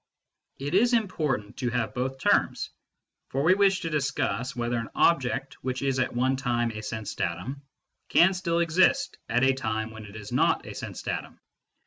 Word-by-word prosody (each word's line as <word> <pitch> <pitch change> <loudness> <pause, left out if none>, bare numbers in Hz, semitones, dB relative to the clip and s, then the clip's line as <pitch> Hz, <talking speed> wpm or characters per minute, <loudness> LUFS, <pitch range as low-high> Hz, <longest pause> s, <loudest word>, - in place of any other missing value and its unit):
It 140 +3 -4
is 235 +6 +4
important 155 - -1
to 125 - -1
have 120 -1 -1
both 130 +1 -2
terms; - - +1 0.6
for 135 +1 -1
we 170 +4 +6
wish 195 -1 +3
to 165 - -2
discuss 135 -3 -1
whether 120 0 -1
an 115 -1 -4
object 135 -3 +1
which 130 +1 -2
is 135 -1 +1
at 130 - 0
one 130 +2 +2
time 120 -3 0
a 110 -1 -6
sense 110 -1 -5
datum 90 +12 -3 0.5
can 190 +3 +6
still 170 -2 0
exist 170 +2 +2
at 120 +3 +2
a 135 0 +5
time 110 -4 -2
when 110 -1 -9
it 100 0 -12
is 105 -1 -8
not - - +2
a - - -7
sense - - -7
datum. - - -4
130 Hz, 180 wpm, -27 LUFS, 115-155 Hz, 0.6 s, we